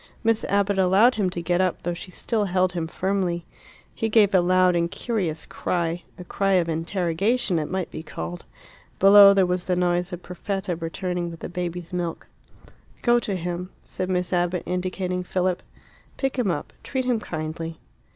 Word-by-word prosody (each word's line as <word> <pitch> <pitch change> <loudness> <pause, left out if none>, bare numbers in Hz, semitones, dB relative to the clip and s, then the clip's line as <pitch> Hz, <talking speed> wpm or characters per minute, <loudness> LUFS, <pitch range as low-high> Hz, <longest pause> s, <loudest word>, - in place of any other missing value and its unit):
Miss 225 0 +2
Abbott 200 0 +1
allowed 195 +7 +5
him 205 -5 0
to 175 -1 -5
get 175 +2 +2
up, 185 -2 0
though 175 - -1
she 170 +2 -8
still 215 +3 -1
held 185 -1 +2
him 170 -2 -2
firmly. 180 -1 -1 0.5
He 225 - -2
gave 210 -2 +4
a 185 - +6
loud 185 0 +4
and 170 0 +1
curious 185 -8 -2
cry 170 -1 -2 0.2
a 180 - -8
cry 195 +2 0
of 180 -3 +3
interrogation 180 +5 0
it 150 - -3
might 185 -1 -3
be - - -6
called. 85 - -6 0.5
Below 200 0 +8
there 190 -1 +5
was 180 0 -1
the 180 - +1
noise 175 0 +1
of 180 0 -7
Perfetta 190 +1 -3
returning 175 +1 -3
with 165 -1 -10
the - - -5
baby's 175 -1 -5
milk. 175 -2 -3 0.8
"Go 240 0 +5
to 205 -4 -3
him," 180 +1 -4 0.2
said 185 0 -4
Miss 180 0 -1
Abbott, 175 0 +1
indicating 180 0 -2
Philip. 180 0 0 0.6
"Pick 270 -1 -1
him 230 -6 +1
up. 160 -4 -3
Treat 260 -1 -2
him 245 -3 +1
kindly." 160 -2 -5
180 Hz, 180 wpm, -24 LUFS, 175-195 Hz, 0.8 s, Below